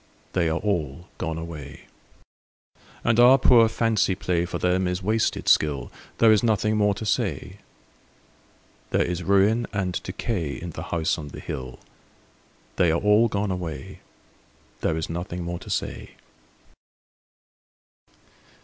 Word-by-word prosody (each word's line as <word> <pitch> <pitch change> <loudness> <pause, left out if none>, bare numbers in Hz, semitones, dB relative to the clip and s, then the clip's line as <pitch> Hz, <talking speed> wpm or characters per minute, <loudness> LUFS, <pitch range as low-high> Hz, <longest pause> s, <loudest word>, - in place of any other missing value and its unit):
They 85 -3 +1
are 80 - 0
all 85 -4 -2
gone 80 -3 -3
away. 75 -4 -8 1.2
And 115 0 +2
our 125 +2 +8
poor 120 -3 +6
fancy 110 -4 +1
play 90 -2 -1
For 85 - -4
them 90 +1 +1
is 90 +1 -3
wasted 110 +3 0
skill: 70 -5 +2 0.3
There 115 -1 +6
is 110 - +4
nothing 110 -1 +1
more 105 -1 +2
to 110 - -6
say. 105 - -2 1.3
There - - +2
is 90 0 -3
ruin 100 +5 +3
and 95 -3 -2
decay 90 -5 -3
In 85 0 -7
the 80 - -7
House 85 0 0
on 75 - -7
the 70 - -9
Hill 65 -1 -6 1.0
They 90 - +4
are 80 +1 +2
all 105 +3 +4
gone 105 -2 -2
away, 80 -7 -6 0.8
There 80 - 0
is 80 - -3
nothing 85 +1 -5
more 85 0 -4
to - - -12
say. - - -4
90 Hz, 140 wpm, -24 LUFS, 80-105 Hz, 1.3 s, our